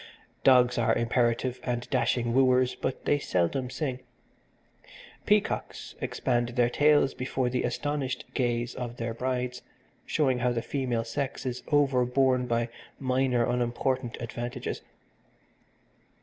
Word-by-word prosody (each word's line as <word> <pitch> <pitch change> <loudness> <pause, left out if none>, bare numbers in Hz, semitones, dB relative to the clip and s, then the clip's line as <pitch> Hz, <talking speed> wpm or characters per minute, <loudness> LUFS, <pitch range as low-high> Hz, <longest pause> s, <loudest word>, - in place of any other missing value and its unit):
Dogs 125 -2 +5
are 115 -1 +3
imperative 120 +1 +1
and 120 -1 -3
dashing 120 -2 +1
wooers, 130 -1 +4
but 130 - -4
they 145 - +3
seldom 125 +5 0
sing. 130 -2 -3 1.3
Peacocks - - 0
expand 120 -2 0
their 120 -1 +3
tails 145 -1 +4
before 130 -1 -2
the 125 - 0
astonished 135 0 -2
gaze 120 -2 0
of 120 -1 -6
their 115 -1 -3
brides, 125 0 -2 0.5
showing 130 -5 +1
how 125 0 +1
the 115 -1 -2
female 125 -5 -1
sex 135 +4 -4
is 125 -1 -3
over 140 -4 +4
borne 125 0 +2
by 115 0 0 0.3
minor, 130 -2 +1
unimportant 125 +1 -1
advantages. 120 +1 -5
125 Hz, 120 wpm, -28 LUFS, 120-130 Hz, 1.3 s, Dogs